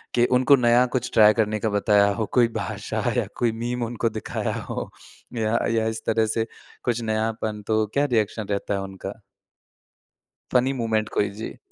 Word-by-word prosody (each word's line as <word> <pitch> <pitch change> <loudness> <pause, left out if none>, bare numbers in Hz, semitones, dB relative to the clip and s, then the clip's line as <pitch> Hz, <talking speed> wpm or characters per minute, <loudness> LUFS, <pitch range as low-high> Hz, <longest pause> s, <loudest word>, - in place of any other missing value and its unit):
कि 120 0 +4
उनको 130 +3 +5
नया 120 0 +4
कुछ 120 - -4
ट्राई 105 -1 +7
करने 110 -1 0
का 110 - 0
बताया 100 0 +3
हो, 110 +1 -2
कोई 120 -2 +5
भाषा - - -4
या - - +1
कोई 120 -2 +2
मीम 120 0 -2
उनको 115 0 -1
दिखाया 110 0 -3 0.2
हो। - - -4 0.5
या 110 +1 +1
या 110 -1 +1
इस 110 0 -3
तरह 110 0 +2
से 110 +1 -1 0.4
कुछ 120 -1 0
नयापन, 110 -1 -2
तो 110 -1 +2
क्या 140 +1 +2
रिएक्शन 110 -4 0
रहता 100 0 -1
है 100 - -1
उनका? 95 +2 -7 1.3
फ़नी 130 +2 +3
मूमेंट 110 -4 -1
कोई, 100 - +1
जी। 105 +3 -8
110 Hz, 175 wpm, -24 LUFS, 110-120 Hz, 1.3 s, ट्राई